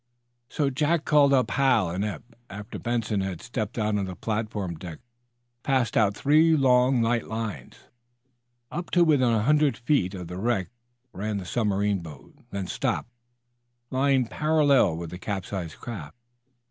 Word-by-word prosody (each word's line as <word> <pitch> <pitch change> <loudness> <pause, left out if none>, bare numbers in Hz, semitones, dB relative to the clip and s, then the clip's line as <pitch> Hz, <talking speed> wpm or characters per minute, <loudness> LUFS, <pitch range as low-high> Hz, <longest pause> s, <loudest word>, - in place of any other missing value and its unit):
So 140 -3 0
Jack 150 +4 +1
called 145 -2 +5
up 130 -2 +2
Hal 125 -10 +2
and 95 +3 -2
Eph. 105 +3 -4 0.3
After 105 +3 -8
Benson 115 -4 -1
had 95 -3 -4
stepped 115 -3 -5
out 105 -2 0
on 100 - -1
the 95 -1 -6
platform 105 -3 -3
deck 85 -1 -8
Hal - - -32 0.6
passed 130 -3 0
out 105 -2 +3
three 155 +3 +4
long, 125 -2 +4
light 115 0 0
lines. 110 - -5 1.0
Up 175 0 -5
to 175 - +4
within 145 -7 +3
a 110 -2 +1
hundred 150 +2 +3
feet 120 -7 0
of 90 -2 -7
the 90 +2 -6
wreck 110 -4 -1 0.4
ran 105 +2 -3
the 95 - -5
submarine 105 -1 0
boat, 80 -4 -12 0.2
then 100 -1 -4
stopped, 115 - -2 0.8
lying 135 -1 +2
parallel 145 - +2
with 85 -1 -6
the 90 - -7
capsized 95 -4 -4
craft. 100 -8 -8
110 Hz, 160 wpm, -26 LUFS, 95-135 Hz, 1.0 s, called